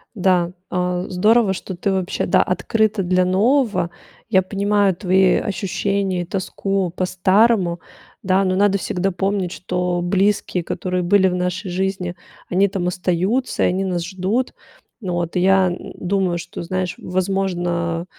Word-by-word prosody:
Да, 180 Hz, -3 st, +2 dB, 0.2 s
а, 180 Hz, 0 st, -1 dB
здорово, 210 Hz, +3 st, +3 dB
что 190 Hz, 0 st, -6 dB
ты 195 Hz, +3 st, -1 dB
вообще, 190 Hz, -1 st, -1 dB
да, -, -, +4 dB
открыта 210 Hz, +3 st, 0 dB
для 185 Hz, 0 st, +2 dB
нового. 210 Hz, 0 st, +2 dB, 0.4 s
Я 190 Hz, -, +4 dB
понимаю 200 Hz, 0 st, +1 dB
твои 190 Hz, 0 st, +3 dB
ощущения 195 Hz, -1 st, -1 dB
и -, -, -4 dB
тоску 195 Hz, 0 st, -2 dB
по 185 Hz, -, 0 dB
старому, 185 Hz, -1 st, +2 dB, 0.4 s
да. 190 Hz, +1 st, +2 dB
Но 185 Hz, -1 st, +1 dB
надо 200 Hz, 0 st, +3 dB
всегда 190 Hz, 0 st, -1 dB
помнить, 190 Hz, -1 st, -1 dB
что 180 Hz, -1 st, -2 dB
близкие, 190 Hz, -1 st, +1 dB
которые 180 Hz, +2 st, -2 dB
были 190 Hz, +2 st, +4 dB
в 180 Hz, -, -1 dB
нашей 180 Hz, +2 st, -2 dB
жизни, 185 Hz, -1 st, -2 dB, 0.3 s
они 190 Hz, +2 st, +3 dB
там 185 Hz, -2 st, -2 dB
остаются, 180 Hz, +8 st, 0 dB
и -, -, +4 dB
они 190 Hz, +2 st, 0 dB
нас 175 Hz, -2 st, -2 dB
ждут. 190 Hz, +7 st, -2 dB, 0.5 s
Ну 185 Hz, -4 st, -3 dB
вот, 175 Hz, 0 st, -2 dB
и -, -, +2 dB
я 190 Hz, +1 st, +4 dB
н 175 Hz, -, -7 dB
думаю, 185 Hz, -1 st, 0 dB
что, 170 Hz, -, -7 dB
знаешь, 180 Hz, +1 st, -2 dB
возможно, 175 Hz, -3 st, -1 dB
185 Hz, 150 wpm, -20 LUFS, 180-195 Hz, 0.5 s, да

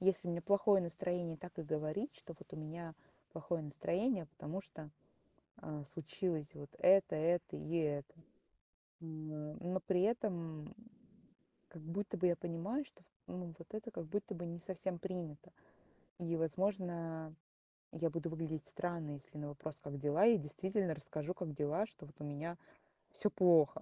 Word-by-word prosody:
Если 185 Hz, -1 st, +3 dB
у -, -, +2 dB
меня 170 Hz, -1 st, -1 dB
плохое 200 Hz, 0 st, +6 dB
настроение, 175 Hz, -1 st, -1 dB
так 175 Hz, +1 st, -10 dB
и -, -, 0 dB
говорить, 155 Hz, -, -1 dB
что 170 Hz, -, -9 dB
вот -, -, -12 dB
у -, -, -5 dB
меня 160 Hz, +1 st, -5 dB, 0.4 s
плохое 165 Hz, +1 st, -1 dB
настроение, 180 Hz, -, +1 dB
потому 160 Hz, +5 st, -4 dB
что, 160 Hz, -5 st, -10 dB, 0.7 s
а, 150 Hz, -1 st, -5 dB
случилось 165 Hz, -1 st, -1 dB
вот 145 Hz, -1 st, -8 dB
это, 190 Hz, -3 st, +7 dB
это 170 Hz, +2 st, +2 dB
и 165 Hz, +2 st, -1 dB
это. 145 Hz, -3 st, +1 dB, 0.9 s
М 155 Hz, -2 st, -5 dB
но 180 Hz, +2 st, +1 dB
при 185 Hz, -1 st, +3 dB
этом 175 Hz, -9 st, 0 dB, 0.9 s
как 165 Hz, -4 st, -10 dB
будто 190 Hz, +6 st, -2 dB
бы 180 Hz, -, +4 dB
я 175 Hz, -1 st, +5 dB
понимаю, 175 Hz, -, -1 dB
что 180 Hz, -, -18 dB, 0.2 s
ну, 175 Hz, -2 st, -5 dB
вот 165 Hz, -, -11 dB
это 220 Hz, +2 st, -3 dB
как 170 Hz, -5 st, -5 dB
будто 205 Hz, +6 st, -1 dB
бы 175 Hz, 0 st, -4 dB
не 170 Hz, 0 st, -4 dB
совсем 185 Hz, -1 st, -2 dB
принято. 175 Hz, -5 st, -5 dB, 0.7 s
И, 170 Hz, -1 st, 0 dB
возможно, 165 Hz, -1 st, 0 dB, 0.6 s
я 165 Hz, 0 st, +1 dB
буду 170 Hz, +1 st, -1 dB
выглядеть 160 Hz, -2 st, -2 dB
странно, 170 Hz, -4 st, -2 dB
если 145 Hz, +1 st, -9 dB
на 145 Hz, 0 st, -3 dB
вопрос: 145 Hz, +1 st, -5 dB
"Как 140 Hz, 0 st, -5 dB
дела?" 150 Hz, +8 st, +4 dB
Я 230 Hz, -1 st, +9 dB
действительно 185 Hz, +4 st, 0 dB
расскажу, 155 Hz, +2 st, -3 dB
как 160 Hz, -5 st, -3 dB
дела, 150 Hz, +9 st, +2 dB
что 150 Hz, -, -13 dB
вот 150 Hz, -, -14 dB
у -, -, -4 dB
меня 155 Hz, +4 st, -3 dB, 0.5 s
всё 210 Hz, -, +2 dB
плохо, 170 Hz, -7 st, +6 dB
170 Hz, 160 wpm, -38 LUFS, 155-185 Hz, 0.9 s, Я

